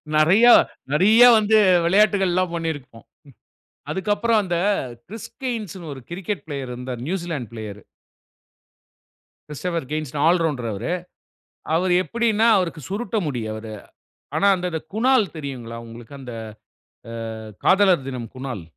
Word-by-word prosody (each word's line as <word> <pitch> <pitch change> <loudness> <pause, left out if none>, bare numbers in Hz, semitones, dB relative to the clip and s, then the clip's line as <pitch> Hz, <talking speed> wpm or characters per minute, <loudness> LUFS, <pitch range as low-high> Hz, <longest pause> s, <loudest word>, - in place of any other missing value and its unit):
நெறய 175 +10 +5 0.5
நெறய 215 +9 +6
வந்து 215 0 +3 0.3
விளையாட்டுகள் 195 0 +3
எல்லாம் 185 -1 0
பண்ணியிருக்கோம். 145 -8 -5 0.9
அதுக்கப்புறம் 210 +4 +1
அந்த 175 -2 -1 0.5
க்றிஸ்டின்ஸ் 225 -2 -6
னு 165 -3 -8
ஒரு 130 - -10
க்ரிக்கெட் 190 +3 -4
ப்ளேயர் 140 -4 -5
இருந்தாரு. 125 -1 -6
New Zealand 165 - -4
player. 105 -2 -8 1.7
Christopher 165 0 -4
hens 155 -3 -3
all 170 +1 +4
rounder 130 -8 -1
அவரு. 100 - -4 0.8
அவரு 180 +2 +2
எப்படின்னா 230 -1 +1
அவருக்கு 175 -4 -1
சுருட்ட 215 +2 -3
முடி. 130 -6 -3
அவர். 110 0 -7 0.6
ஆனா 200 - +3
அந்த 180 -3 -3
குணால் 230 - +2
தெரியுங்களா? 130 -6 -6
உங்களுக்கு 115 +3 -12
அந்த 125 -3 -8 0.8
அ - - -7 0.5
காதலர் 190 -8 +4
தினம் 120 -4 -6
குணால். 130 -7 -5
170 Hz, 120 wpm, -22 LUFS, 130-200 Hz, 1.7 s, நெறய